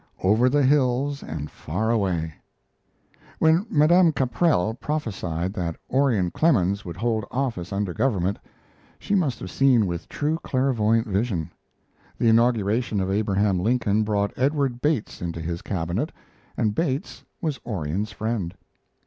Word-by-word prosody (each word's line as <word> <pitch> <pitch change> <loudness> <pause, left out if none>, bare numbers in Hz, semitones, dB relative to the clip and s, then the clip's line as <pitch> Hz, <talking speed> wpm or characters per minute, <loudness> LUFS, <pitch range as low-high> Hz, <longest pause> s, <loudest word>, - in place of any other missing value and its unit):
OVER 110 +7 +4
THE 145 +2 +3
HILLS 140 +1 +2
AND 75 -1 -6
FAR 105 +9 -2
AWAY 90 -8 0 1.0
When 165 +7 +3
Madame 165 +3 +5
Caprell 130 - +1
prophesied 100 - -3
that 85 -5 -3 0.2
Orion 125 -10 +2
Clemens 100 - +2
would 85 -1 -7
hold 110 +1 0
office 120 -10 -2
under 100 -2 -2
government, 100 -5 0 0.6
she - - -4
must 155 - +1
have 95 - -6
seen 130 -5 +4
with 85 -2 -4
true 155 +2 -1
clairvoyant 115 -4 +1
vision. 100 -6 -1 0.7
The 115 - +3
inauguration 115 -1 +2
of 95 0 -1
Abraham 100 -2 +1
Lincoln 110 0 +1
brought 105 -1 0
Edward 135 -2 0
Bates 145 -7 -1
into 85 -1 -4
his 85 +1 -4
Cabinet, 95 - -2 0.5
and 110 -4 +1
Bates 145 - -2 0.2
was 155 -8 -2
Orion's 100 0 -3
friend. 110 -6 -3
110 Hz, 130 wpm, -24 LUFS, 95-135 Hz, 1.0 s, Madame